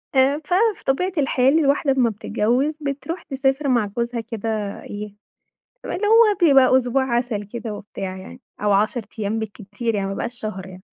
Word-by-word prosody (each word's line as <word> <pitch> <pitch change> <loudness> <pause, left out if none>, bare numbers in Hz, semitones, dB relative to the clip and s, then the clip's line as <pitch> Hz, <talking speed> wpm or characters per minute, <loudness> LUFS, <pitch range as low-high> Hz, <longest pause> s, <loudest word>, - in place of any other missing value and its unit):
آآ، 270 +3 +4
ففي 405 +3 +1
طبيعة 365 +8 +1
الحال 270 +2 +3
الواحدة 280 -1 +2
لما 250 -3 +3
بتتجوز 240 +8 0
بتروح 290 +5 -4
تسافر 270 +1 0
مع 240 -5 +3
جوزها 235 0 -1
كده 225 0 -5 0.3
إيه، 205 0 -7 0.7
اللي 415 +3 -2
هو 445 -2 +6
بيبقى 265 -2 +6
أسبوع 260 +1 +1
عسل 235 -4 -2
كده 225 +1 -6
وبتاع 195 -2 -6
يعني، 245 +7 -11 0.2
أو 210 -1 +2
10 215 +5 +2 0.2
أيام 215 +2 -1
بالكتير 215 +1 -4
يعني، 195 -1 -1
ما 195 - -3
بيبقاش 240 +4 -5
شهر 195 -4 -5
يعني. 185 0 -12
245 Hz, 165 wpm, -22 LUFS, 210-275 Hz, 0.7 s, هو